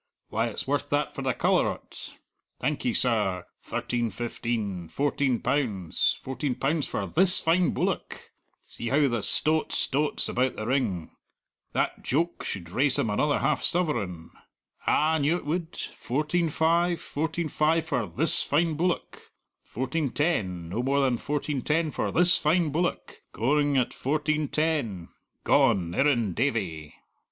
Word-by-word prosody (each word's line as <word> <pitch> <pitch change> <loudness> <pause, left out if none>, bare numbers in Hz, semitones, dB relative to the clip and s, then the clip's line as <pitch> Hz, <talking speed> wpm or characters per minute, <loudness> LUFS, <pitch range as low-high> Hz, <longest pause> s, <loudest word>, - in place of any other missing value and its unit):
why, - - 0
it's - - -4
worth - - -1
that - - 0
for - - -6
the - - 0
colour - - +2
o't; - - -7 0.4
thank - - -1
ye, 245 - +2
sir 105 - +1 0.2
thirteen 120 -2 -2
fifteen; 105 -5 -4
fourteen 140 -3 0
pounds; 120 - 0
fourteen 130 0 -2
pounds 145 +4 0
for - - -3
this 185 +3 +4
fine 170 +2 +2
bullock; - - -3 0.3
see 120 - -5
how 140 +3 +3
the 120 -4 -1
stot 155 +8 +2
stots 145 +2 0
about 130 +1 0
the 110 - -5
ring; 115 - -1 0.6
that - - -1
joke 170 +6 -1
should 85 -3 -5
raise 135 +6 +2
him 110 - 0
another 145 +8 +1
half 140 0 0
sovereign; 110 - +1 0.6
ah, 155 +2 +3
I - - +2
knew 150 +4 +2
it - - -10
would 165 +2 -3
fourteen 155 +6 -1
five; 170 +3 +2
fourteen 160 +2 -3
five 160 +2 +1
for 125 -9 -1
this 160 +5 +4
fine 160 +3 +1
bullock; 175 +3 -3 0.3
fourteen 135 +4 -2
ten; 95 - -1
no 105 +7 -2
more 140 +2 +1
than 130 -4 +1
fourteen 145 -1 -2
ten 155 +3 0
for - - -2
this 175 +1 +4
fine 160 0 +2
bullock; 175 +4 -2
going 145 +4 +1
at 125 - +1
fourteen 155 +2 -1
ten; 140 - -1 0.3
gone 105 -12 +3
Irrendavie." 110 - 0
140 Hz, 145 wpm, -27 LUFS, 115-155 Hz, 0.6 s, this